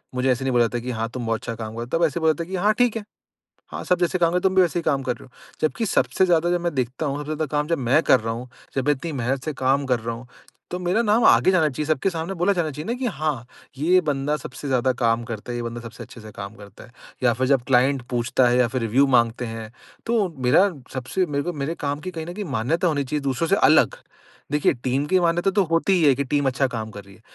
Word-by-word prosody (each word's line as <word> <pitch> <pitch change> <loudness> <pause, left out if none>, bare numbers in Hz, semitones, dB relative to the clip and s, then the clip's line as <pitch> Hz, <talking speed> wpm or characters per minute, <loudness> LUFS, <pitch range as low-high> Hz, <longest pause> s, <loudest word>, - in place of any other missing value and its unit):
मुझे 125 +1 +1
ऐसे 125 +2 -1
नहीं 130 - +1
बोला 120 - +4
जाता 120 +1 -2
कि 125 +2 -5
हाँ, 115 -1 -2
तुम 120 0 -5
बहुत 115 -1 0
अच्छा 115 -1 -5
काम 110 -1 -7
कर 115 - -4
रहे - - -4
हो। 125 - -1
तब 170 - +3
ऐसे 160 +2 -1
बोला 160 0 +4
जाता 170 - -5
है 170 - -12
कि - - -2
हाँ, 210 +4 +3
ठीक 245 -2 +3
है। 220 - -5 0.7
हाँ, - - -5
सब 180 -1 +2
जैसे 180 +1 +1
काम 170 +1 +3
तुम 190 0 +1
भी 190 - +6
वैसे 175 0 0
ही 170 - -5
काम 140 -3 0
कर 125 -2 -1
रहे - - -14
हो। 125 - -21 0.3
जबकि 190 +9 0
सबसे 190 -1 +2
ज़्यादा 175 -1 +2
जब 175 -1 0
मैं 170 -2 -1
देखता 130 +4 -2
हूँ, 140 0 -2
सबसे 150 - -6
ज़्यादा 155 +1 -1
काम 150 +1 0
जब 165 -1 0
मैं 130 +5 +3
कर 130 - +5
रहा 115 0 -2
हूँ, 125 +2 -7 0.3
जब 135 - 0
मैं 150 - +5
इतनी 145 +4 -6
मेहनत 130 -1 -2
से 155 - -2
काम 135 +2 +1
कर 125 -2 +1
रहा 115 +1 -4
हूँ 120 +2 -11 0.4
तो 180 - -2
मेरा 180 +6 +1
नाम 215 +2 +3
आगे 120 +11 +6
जाना 160 -5 +3
चाहिए। 150 +3 -4
सबके 155 +5 +1
सामने 170 +2 -4
बोला 180 +3 +2
जाना 170 -4 -1
चाहिए 150 +6 -7
ना 235 - 0
कि 260 - -2
हाँ, 155 - -2 0.3
ये 175 +6 +4
बंदा 145 0 -1
सबसे 145 - -8
ज़्यादा 130 0 +2
काम 115 0 +2
करता 115 +1 -6
ये 120 - -3
बंदा 115 0 -5
सबसे 120 +1 -9
अच्छे 120 0 -13
से 110 0 -11
काम 100 +2 -7
करता 100 -1 -13
है। - - -20 0.3
या 120 -2 +4
फ़िर 130 +2 -1
जब 135 -3 +2
क्लाइंट 130 +1 +3
पूछता 125 +1 +2
है 125 - +2
या 125 - +4
फ़िर 125 +1 -3
रिव्यू 125 +5 +3
माँगते 120 -1 +2
हैं 115 -1 -7 0.4
तो 225 -4 +2 0.2
मेरा 190 +11 +5 0.2
सबसे 135 +8 -1
मेरे 145 -2 -2
को 175 - -3
मेरे 150 +2 -3
काम 145 0 -2
की 185 - -5
कहीं 160 -2 -6
न 175 - -6
कहीं 205 0 -5
मान्यता 150 - 0
होनी 145 -3 0
चाहिए 145 +2 -3
दूसरों 140 +4 -1
से 195 - +4
अलग। - - +4 0.6
देखिए 150 0 +3
टीम 130 +3 0
की 185 +2 +3
मान्यता 175 +2 +2
तो 200 0 +3
होती 165 +3 +1
ही 180 -3 +3
है 140 - +6
की 140 - -1
टीम 145 +1 0
अच्छा 135 +1 +1
काम 110 -3 -5
कर 100 -1 -9
रही 100 0 -16
है। - - -22
140 Hz, 285 wpm, -23 LUFS, 120-170 Hz, 0.7 s, भी